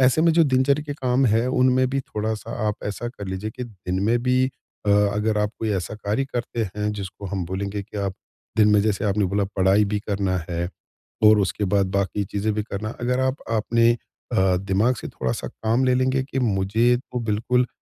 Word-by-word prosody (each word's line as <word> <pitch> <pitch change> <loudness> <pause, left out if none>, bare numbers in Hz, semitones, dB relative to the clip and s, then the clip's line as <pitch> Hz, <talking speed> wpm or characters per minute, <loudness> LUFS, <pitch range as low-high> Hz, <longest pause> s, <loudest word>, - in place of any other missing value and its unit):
ऐसे 130 +4 +4
में 165 0 +5
जो 165 +1 +5
दिनचर्या 135 +1 +2
के 145 - -3
काम 130 -1 +1
है 115 +2 +2
उनमें 130 0 +3
भी 135 +1 0
थोड़ा-सा 110 -2 -4 0.2
आप 105 - +1
ऐसा 105 +3 -3
कर 105 -5 -8
लीजिए 95 +3 -4
कि 125 +1 -6
दिन 95 -5 -4
में 115 +3 +3
भी 130 +1 +3 0.4
अ, - - +3
अगर 105 +1 +2
आप 105 0 +1
कोई 110 - -2
ऐसा 90 +3 -5
कार्य 105 +4 -1
करते 120 -3 -3
हैं 105 0 0
जिसको 100 -1 -6
हम 95 -1 -3
बोलेंगे 100 +3 -3
कि 105 +2 -11
आप, 100 -1 -2 0.4
दिन 105 -1 +5
में 105 -1 +5
जैसे 105 -1 0
आपने 105 0 +2
बोला 100 +2 +1
पढ़ाई 95 +2 +4
भी 105 +1 -1
करना 100 -2 0
है 85 0 -1 0.6
और 105 0 +7
उसके 100 +1 -1
बाद 100 -1 +3
बाकी 100 +1 0
चीजें 105 +2 -1
भी 105 - -1
करना 105 +1 -5
है। 110 - -6
अगर 125 +2 0
आप 130 +1 +1
आपने 115 +1 +3
अ, 95 -5 -1
दिमाग 100 +6 +1
से - - -6
थोड़ा-सा 65 -2 -3
काम 115 +4 0
ले 130 -1 +3
लेंगे 130 +1 +2
कि 135 0 -4
मुझे 110 +2 +2
तो 125 0 -6
बिल्कुल 115 +3 +1
105 Hz, 210 wpm, -23 LUFS, 100-125 Hz, 0.6 s, और